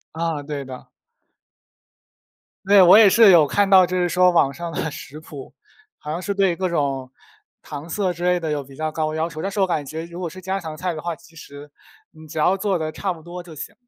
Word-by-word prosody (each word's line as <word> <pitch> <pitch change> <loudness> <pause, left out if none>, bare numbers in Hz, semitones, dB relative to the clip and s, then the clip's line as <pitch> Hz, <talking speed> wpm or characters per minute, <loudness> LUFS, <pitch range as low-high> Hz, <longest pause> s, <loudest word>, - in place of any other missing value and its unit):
啊， 165 -3 -2
对 145 -1 -6
的。 130 -1 -10 1.8
对， 200 0 +6
我 180 +2 +8
也 215 -3 +7
是 220 -2 +7
有 165 -3 +7
看 200 +8 +1
到， 190 -1 +7
就 180 +1 -3
是 180 -1 +1
说 180 +1 +4
网 155 -6 +2
上 170 -1 -6
的 160 - -3
食 145 0 -9
谱， 145 -3 -11 0.5
好 150 - -6
像 170 +3 -4
是 200 - -2
对 195 -3 +1
各 185 +2 -2
种 135 -6 -2 0.5
糖 150 +2 -9
色 190 +1 -1
之 175 0 -10
类 180 0 +2
的 160 -2 -3
有 145 -1 -2
比 135 0 -15
较 155 +1 -3
高 155 -1 -2
要 160 +1 -1
求。 155 -1 -8
但 195 - -2
是 200 - -7
我 195 - +3
感 160 -5 -2
觉 160 +4 -6
如 170 +1 -9
果 175 - -4
是 185 +3 -11
家 190 +1 -3
常 160 -2 -7
菜 180 +2 -3
的 155 - -7
话， 170 -1 -4
其 170 0 -21
实 145 -2 -12 0.4
你 155 0 -15
只 155 - -6
要 185 +5 +3
做 195 -2 -1
得 155 -1 -4
差 195 -2 -3
不 165 - -12
多 175 +2 -9
就 170 - -13
行。 - - -8
170 Hz, 260 characters per minute, -21 LUFS, 155-185 Hz, 1.8 s, 我